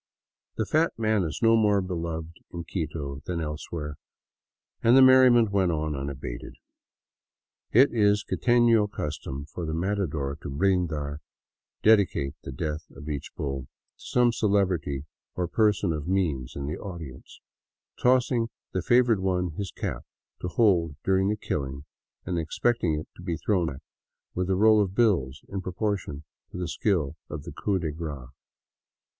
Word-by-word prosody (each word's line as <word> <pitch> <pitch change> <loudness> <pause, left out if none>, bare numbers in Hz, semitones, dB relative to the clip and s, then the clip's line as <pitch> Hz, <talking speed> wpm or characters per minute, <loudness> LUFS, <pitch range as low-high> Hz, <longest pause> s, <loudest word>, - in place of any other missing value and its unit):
The 110 - 0
fat 160 +8 +2
man 110 -2 +2
is 80 -4 -4
no 115 0 +6
more 105 -2 +4
beloved 85 -3 -4
in 85 -1 -5
Quito 75 -5 -4
than 90 -2 -2
elsewhere, 75 -1 -5 0.8
and 120 +3 +6
the - - +8
merriment 130 -4 +7
went 95 -3 +2
on 75 -1 -1
unabated. 70 -3 -6 1.2
It 130 +4 +5
is 105 -2 +3
quiteiio 120 -4 +3
custom 70 -3 -5
for 80 +3 -7
the 80 -1 -2
matador 80 -7 -2
to - - -6
brindar 80 -3 0 0.6
(dedicate 100 -10 +3
the - - -7
death 75 +3 -4
of 75 -1 -8
each 70 -2 -4
bull) 70 -2 -3
to 65 - -12 0.3
some 125 -1 +2
celebrity 95 - 0 0.3
or 90 -1 -1
person 105 -2 +2
of 75 0 -4
means 80 -10 -1
in 70 - -4
the 75 +2 -4
audience, 80 -10 -9 0.6
tossing 125 -2 +3 0.2
the 95 - -1
favored 120 0 +4
one 90 -2 0
his 95 +4 -4
cap - - -4 0.4
to - - -2
hold 90 -6 +2
during 95 +1 +2
the 105 - 0
killing, 70 -6 -4 0.4
and 90 -2 -1
ex 80 -1 -5
pecting 90 -11 +1
it 75 - -8
to - - -11
be 85 -2 -2
thrown 90 -3 +1
back 70 -3 -6 0.5
with 90 +1 -2
a 95 - +3
roll 110 +2 +5
of 95 -1 -2
bills 85 - +2
in 95 -1 -4
proportion 95 -5 -3 0.3
to - - -8
the 90 -1 -2
skill 85 -5 0
of 75 -1 -6
the - - -8
coup 100 -2 -1
de 80 -4 -2
grace. 75 -5 -6
90 Hz, 155 wpm, -27 LUFS, 75-105 Hz, 1.2 s, the